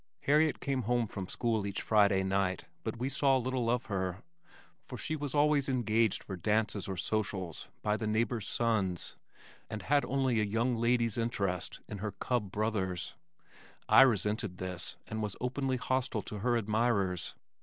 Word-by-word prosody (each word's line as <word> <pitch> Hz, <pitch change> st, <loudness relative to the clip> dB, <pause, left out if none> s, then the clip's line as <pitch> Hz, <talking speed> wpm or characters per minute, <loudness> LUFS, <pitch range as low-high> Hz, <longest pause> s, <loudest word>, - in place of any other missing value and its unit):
Harriet 150 Hz, +2 st, +3 dB
came 135 Hz, -2 st, -1 dB
home 120 Hz, -1 st, +3 dB
from 100 Hz, -3 st, -6 dB
school 115 Hz, -1 st, 0 dB
each 100 Hz, -, -3 dB
Friday 100 Hz, -3 st, +4 dB
night 95 Hz, -1 st, 0 dB, 0.2 s
but -, -, -3 dB
we 125 Hz, +3 st, -1 dB
saw 135 Hz, -1 st, +3 dB
little 125 Hz, -2 st, -1 dB
of 125 Hz, +1 st, +1 dB
her, 95 Hz, -2 st, -3 dB, 0.6 s
for 125 Hz, -, -8 dB
she 155 Hz, -, -2 dB
was 145 Hz, -2 st, -4 dB
always 145 Hz, -1 st, +3 dB
engaged 115 Hz, -4 st, +2 dB
for 95 Hz, -, -5 dB
dances 105 Hz, +2 st, 0 dB
or 95 Hz, -2 st, -4 dB
socials 95 Hz, -3 st, -2 dB, 0.2 s
by 105 Hz, 0 st, +2 dB
the 110 Hz, 0 st, -3 dB
neighbors' 110 Hz, 0 st, 0 dB
sons, 100 Hz, -7 st, 0 dB, 0.5 s
and 110 Hz, -, -5 dB
had 145 Hz, 0 st, +3 dB
only 130 Hz, -3 st, +1 dB
a -, -, +3 dB
young 115 Hz, +4 st, +1 dB
lady's 115 Hz, -1 st, +1 dB
interest 100 Hz, -7 st, -2 dB
in 105 Hz, -, -6 dB
her 105 Hz, 0 st, -3 dB
cub 110 Hz, -2 st, -1 dB
brothers. 95 Hz, -5 st, -1 dB, 0.7 s
I -, -, +8 dB
resented 105 Hz, -6 st, +2 dB
this 90 Hz, -1 st, -4 dB
and 110 Hz, 0 st, -4 dB
was 105 Hz, -2 st, -2 dB
openly 130 Hz, +1 st, -1 dB
hostile 125 Hz, -3 st, -1 dB
to 105 Hz, -, -6 dB
her 120 Hz, +3 st, +2 dB
admirers. 105 Hz, -5 st, 0 dB
110 Hz, 165 wpm, -32 LUFS, 100-125 Hz, 0.7 s, I